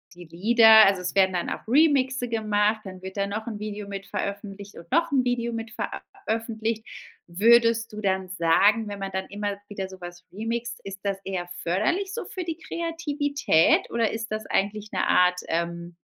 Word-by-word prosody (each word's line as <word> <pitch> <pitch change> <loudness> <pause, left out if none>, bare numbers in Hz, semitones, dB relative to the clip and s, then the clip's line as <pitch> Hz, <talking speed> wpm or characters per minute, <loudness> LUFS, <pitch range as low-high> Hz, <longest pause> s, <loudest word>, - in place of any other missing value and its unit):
die 175 0 -11
Lieder 220 +6 +7
also 195 -2 +2
es 180 - -3
werden 190 -1 +3
dann 175 - -2
auch - - -6
Remixe 265 -3 +3
gemacht, 215 -1 +1
dann 185 -1 -9
wird 190 +2 -8
da 200 - 0
noch 215 +3 -5
'n 215 -3 -5
Video 210 -1 -5
mit 195 0 -6
veröffentlicht 200 0 -5
und 170 - -12
noch 335 +3 +2
'n 260 -2 +2
Video 240 -1 0
mit 225 -1 -5
ver - - -4
ä - - -5 0.3
öffentlicht. 225 0 -2 0.4
Würdest 230 +5 +4
du 215 - -7
dann 190 -2 -1
sagen, 195 +5 +3
wenn 200 -1 -6
man 195 0 -4
dann 190 0 -3
immer 205 0 -4
wieder 195 -2 -5
so 190 0 -12
was 175 0 -10
remixt, 235 +3 -4
ist 195 0 -7
das 200 -1 -1
eher 180 -2 -4
förderlich 345 - 0
so 465 - -4
für 370 -2 -6
die 330 -2 -3
Kreativität 295 - +1
oder 230 -1 +1
ist 225 -1 -5
das 215 0 -3
eigentlich 205 +2 -1
'ne - - 0
Art, 180 0 +3
ähm, 170 +1 -3
210 Hz, 195 wpm, -25 LUFS, 190-235 Hz, 0.4 s, Lieder